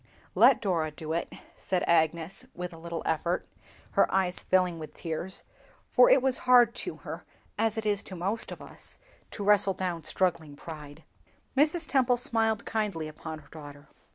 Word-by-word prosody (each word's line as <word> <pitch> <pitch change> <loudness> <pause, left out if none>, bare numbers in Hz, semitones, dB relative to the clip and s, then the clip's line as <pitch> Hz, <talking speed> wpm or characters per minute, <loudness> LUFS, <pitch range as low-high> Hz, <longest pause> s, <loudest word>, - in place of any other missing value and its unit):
"Let - - +6
Dora 170 -6 0
do 155 +1 -6
it," 170 - -2 0.2
said 185 -2 -1
Agnes, 165 +1 +1
with 180 0 -5
a 165 - -11
little 170 0 -5
effort, 170 +3 -1 0.4
her - - +3
eyes 190 -1 +1
filling 180 -3 +1
with 155 - -9
tears, 170 +3 -4 0.5
for - - +6
it 270 - +5
was 265 -1 +3
hard 240 -2 +7
to - - -3
her, - - -6 0.3
as 225 0 0
it 220 - -3
is 205 -1 +1
to 190 - -7
most 195 +6 -2
of - - -8
us, - - -11 0.3
to 205 - -6
wrestle 200 -1 +4
down 180 -3 -3
struggling 165 -2 -1
pride. 150 -1 -10 0.5
Mrs. 310 +4 +2
Temple 255 -3 +3
smiled 225 -4 +1
kindly 205 -8 -2
upon 155 +1 -7
her 155 - -17
daughter. 145 -2 -12
180 Hz, 170 wpm, -28 LUFS, 160-220 Hz, 0.5 s, hard